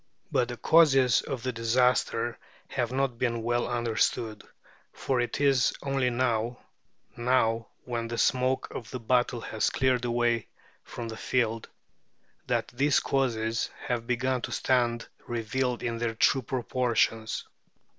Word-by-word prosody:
But 125 - +2
the 120 0 -6
causes 135 -7 +5
of 130 -4 -5
the 130 - -1
disaster 120 0 +1 0.3
have 120 -2 -1
not 130 -2 -1
been 115 -2 0
well 120 +1 0
understood, 115 -2 -1 0.5
for 130 -2 0
it 120 - -2
is 135 -3 +3
only 135 -2 +1
now 120 -1 0 0.6
now, 115 -2 +1 0.2
when 115 -2 -3
the 120 0 -4
smoke 130 +2 +1
of 115 - -7
the 130 - -5
battle 120 0 +1
has 110 -1 0
cleared 130 -2 +1
away 120 -1 +1 0.4
from 120 - -7
the 110 0 -6
field 115 -3 -1 0.8
that - - 0
these 140 +3 +2
causes 115 -4 0 0.2
have 120 -2 -2
begun 125 +1 0
to - - -5
stand 120 -3 +1 0.2
revealed 120 +2 -2
in 115 -1 -2
their 115 -1 -1
true 130 +4 +3
proportions. 120 -2 0
120 Hz, 135 wpm, -28 LUFS, 115-130 Hz, 0.8 s, causes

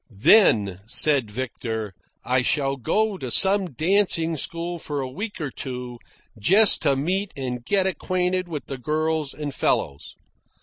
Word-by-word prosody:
"Then," 105 - +4
said 135 -1 +2
Victor, 110 -3 -5 0.3
"I 125 0 +1
shall 135 +1 0
go 205 - -1
to 130 - -5
some 190 - +3
dancing 165 - +2
school 170 +3 -4
for 145 -2 -5
a 135 - -3
week 205 - -6
or 150 -4 -4
two, 125 -2 -7 0.4
just 195 - +5
to 140 - +2
meet 185 +8 -2
and 125 -2 -5
get 190 +8 +1
acquainted 185 0 -1
with 155 -4 -6
the 135 -2 -7
girls 155 +1 -1
and 150 -2 -6
fellows. 70 - -2
150 Hz, 145 wpm, -23 LUFS, 125-185 Hz, 0.4 s, just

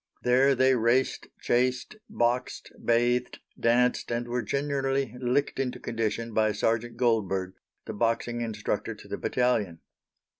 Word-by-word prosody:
There 130 +3 +4
they 130 +1 +4
raced, 120 +3 +1
chased, 125 - 0
boxed, 120 +2 -1
bathed, 120 +1 +1 0.2
danced, 125 +1 +2
and 120 0 -2
were 120 +1 -1
generally 135 0 -1
licked 130 +3 0
into 130 -2 -2
condition 115 0 -3
by 110 -1 +2
Sergeant 115 +2 -1
Goldberg, 95 -6 0 0.3
the - - -5
boxing 115 +2 -1
instructor 115 -2 -3
to - - -14
the - - -5
battalion. 110 -9 0
120 Hz, 125 wpm, -27 LUFS, 115-125 Hz, 0.3 s, There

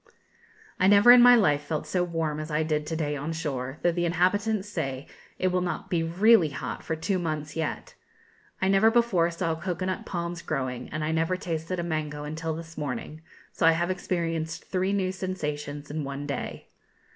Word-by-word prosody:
I 185 - +4
never 205 +4 +8
in 245 0 +9
my 245 0 +9
life 150 -11 +3
felt 150 +1 -3
so 180 -1 0
warm 165 -3 -2
as 155 +1 -5
I 155 +1 +1
did 150 -1 -1
to 160 - -2
day 150 -2 -1
on 145 +3 -4
shore, 135 -4 -4
though 175 - +4
the 175 +1 -1
inhabitants 200 +4 +1
say 135 -9 -4 0.3
it 185 - +1
will 180 0 +1
not 180 -1 -4
be 170 -2 +2
really 180 +2 +4
hot 140 - -5
for 160 - -3
two 185 +4 -1
months 155 -3 -3
yet; 160 -1 -3 0.7
I 190 - +1
never 195 +3 +5
before 225 -8 +3
saw 170 -1 -1
cocoa 180 +2 -3
nut 185 0 -2
palms 170 -1 -4
growing; 130 -5 -3
and 155 +1 -3
I 155 - 0
never 165 +3 +1
tasted 170 0 -3
a - - -1
mango 155 -3 -3
until 160 +2 -4
this 165 0 -8
morning; 150 +2 -5 0.3
so 165 - +2
I 165 - +7
have 175 +2 0
experienced 165 -3 -2
three 185 +1 -1
new 190 -2 0
sensations 150 -6 -4
in 155 0 -3
one 140 +1 -5
day. 140 - -5
165 Hz, 195 wpm, -27 LUFS, 150-185 Hz, 0.7 s, in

